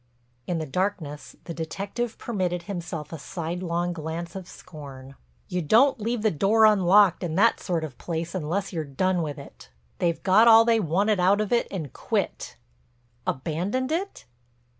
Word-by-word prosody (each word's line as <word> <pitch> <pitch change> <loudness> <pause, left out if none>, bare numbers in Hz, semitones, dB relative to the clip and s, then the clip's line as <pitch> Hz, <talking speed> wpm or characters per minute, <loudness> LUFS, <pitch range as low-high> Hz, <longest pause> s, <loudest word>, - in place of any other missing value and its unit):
In 175 - -1
the 160 - -3
darkness 160 -2 -3
the 170 - -6
detective 200 +8 -4
permitted 180 -6 -2
himself 170 -4 -6
a 160 - -6
sidelong 175 +1 -3
glance 165 +2 -5
of 190 -2 -7
scorn. 140 -8 -11 0.3
"You 180 - -2
don't 235 - +4
leave 230 0 -2
the 215 - +3
door 205 +8 +4
unlocked 200 -2 +5
in 165 -2 -2
that 225 +5 +4
sort 170 -4 -2
of 140 -6 -7
place 170 0 -4
unless 185 +3 -2
you're 160 -2 -2
done 175 +6 0
with 150 -2 -4
it. 140 - -13 0.3
They've 170 -2 0
got 210 +4 +5
all 225 0 +8
they 230 -1 +3
wanted 200 +3 +1
out 190 +3 +4
of 215 -1 -2
it 235 - +2
and 160 -9 -6
quit." - - -3 0.7
"Abandoned 180 - -2
it?" 380 +5 -3
180 Hz, 160 wpm, -25 LUFS, 160-205 Hz, 0.7 s, all